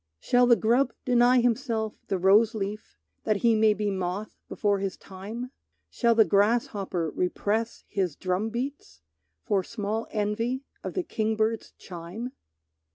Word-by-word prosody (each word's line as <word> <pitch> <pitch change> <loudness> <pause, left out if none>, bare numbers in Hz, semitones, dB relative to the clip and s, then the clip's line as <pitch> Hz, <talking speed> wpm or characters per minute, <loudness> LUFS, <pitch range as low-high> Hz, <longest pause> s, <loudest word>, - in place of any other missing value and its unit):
Shall 245 0 +3
the 240 - +7
grub 240 +3 +2
deny 245 0 +5
himself 230 -3 0
the 195 - 0
rose 205 +5 +4
leaf 210 0 -5 0.3
That 215 - +1
he 230 - +6
may 215 -1 +4
be 210 -1 -1
moth 190 +2 -3 0.2
before 205 -2 0
his 195 -1 -3
time? 215 +7 -8 0.4
Shall 235 -2 +2
the 220 -1 +6
grasshopper 200 -5 +1
repress 210 +5 -1
his 185 -7 -1
drumbeats 220 - -3 0.4
For 195 - +1
small 220 +2 -3
envy 225 +5 -1 0.2
of - - -5
the 370 - 0
kingbird's 220 -3 -1
chime? 180 +8 -7
215 Hz, 135 wpm, -27 LUFS, 195-235 Hz, 0.4 s, the